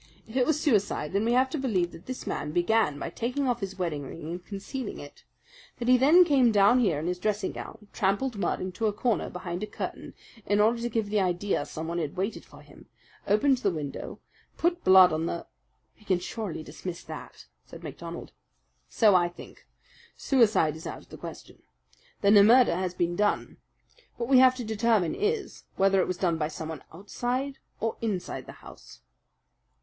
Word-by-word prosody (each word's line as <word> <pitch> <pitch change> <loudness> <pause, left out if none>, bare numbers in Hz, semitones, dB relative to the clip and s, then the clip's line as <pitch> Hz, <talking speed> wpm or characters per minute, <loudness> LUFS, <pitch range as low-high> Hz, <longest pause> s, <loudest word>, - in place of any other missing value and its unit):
If 220 - -12
it 255 -2 +2
were 315 - +4
suicide, 210 - 0
then 200 +2 +1
we 235 - +2
have 260 +1 +3
to 310 - -2
believe 190 -10 0
that 165 - -14
this 255 0 -6
man 150 - -3
began 175 -3 +2
by - - -5
taking 250 +4 -2
off 245 -1 0
his 195 -2 -5
wedding 165 -6 -2
ring 155 +3 -7
and 175 +1 -6
concealing 205 +5 -6
it; 145 - -12 0.5
that 240 - -4
he 255 - +7
then 305 +8 +6
came 265 -7 +4
down 205 +4 +5
here 190 -11 +2
in 150 - -4
his 180 +1 -2
dressing 210 +2 -1
gown, 220 -2 -9
trampled 210 +6 0
mud 200 - -1
into 185 +4 -2
a 210 - 0
corner 220 +1 0
behind 180 0 -5
the 215 - -3
curtain - - -6 0.3
in 205 +1 +1
order 230 +3 +3
to 240 - -2
give 220 -3 -2
the 210 - +2
idea 180 -3 0
someone 165 +2 -4
had 155 -1 -4
waited 195 +4 -2
for - - -16
him, - - -17 0.4
opened 250 +6 +3
the 210 - +1
window, 150 -6 -6 0.4
put 345 +1 0
blood 185 -3 +7
on 160 +1 -1
the 170 - -4 0.3
" 130 - -46
"We - - -20
can 190 -3 +2
surely 185 -2 -5
dismiss 175 +2 -7
that," - - -10 0.2
said - - -12
MacDonald. 170 0 -8 0.6
"So 215 -3 +4
I 175 -1 +4
think. 175 - -14 0.5
Suicide 220 - +3
is 160 - -8
out - - -7
of - - -25
the - - -10
question. - - -10 0.6
Then 200 +1 +5
a 200 - +8
murder 240 -3 +6
has 180 0 -2
been 175 0 0
done. 205 +2 0 0.6
What 235 +1 -3
we 260 -2 +7
have 255 0 +6
to 250 - -5
determine 220 -5 +1
is, 425 0 -2
whether 195 0 +3
it - - -1
was 185 - -2
done 170 -3 0
by 150 - 0
someone 160 -1 -7
outside 245 - -3 0.2
or 225 0 -2
inside 210 -6 -3
the - - -8
house." - - -14
205 Hz, 195 wpm, -27 LUFS, 175-240 Hz, 0.6 s, a